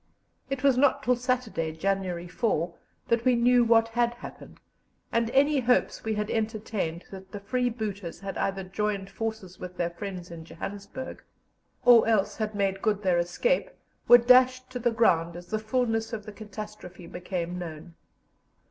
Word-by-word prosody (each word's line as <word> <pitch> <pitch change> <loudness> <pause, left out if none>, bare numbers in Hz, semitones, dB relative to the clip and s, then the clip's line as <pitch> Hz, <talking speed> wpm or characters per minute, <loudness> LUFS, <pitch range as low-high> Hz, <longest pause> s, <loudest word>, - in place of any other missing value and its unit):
It 275 -1 -3
was 270 -3 +4
not 280 -1 +3
till 250 +3 +3
Saturday, 245 -10 -1
January 180 0 -2
4, 175 -3 -1 0.4
that 235 0 +2
we 255 -1 +4
knew 245 +1 +4
what 230 -1 +4
had 240 +1 +1
happened, 240 - -11 0.5
and 230 -1 +1
any 280 +3 +3
hopes 245 0 +1
we 220 -1 -1
had 210 0 -2
entertained 215 -6 -2
that 190 -1 -10
the 205 - -6
freebooters 215 -5 -3
had 195 -1 -5
either 195 0 -1
joined 195 +1 -3
forces 220 -5 -5
with 180 0 -8
their 175 -1 -1
friends 180 0 -7
in 165 -1 -8
Johannesburg, 205 +9 -7 0.6
or 240 -2 +7
else 215 -3 +1
had 215 -1 -3
made 195 -1 0
good 210 -2 0
their 180 -2 +3
escape, 485 - 0 0.4
were 240 - +10
dashed 255 +1 +4
to 250 - -4
the 240 0 +2
ground 170 -8 +2
as 175 0 -8
the 215 - -1
fulness 225 0 -1
of 210 -2 -5
the 215 - -7
catastrophe 210 -4 -9
became 175 0 -4
known. 165 0 -8
215 Hz, 165 wpm, -27 LUFS, 185-240 Hz, 0.6 s, were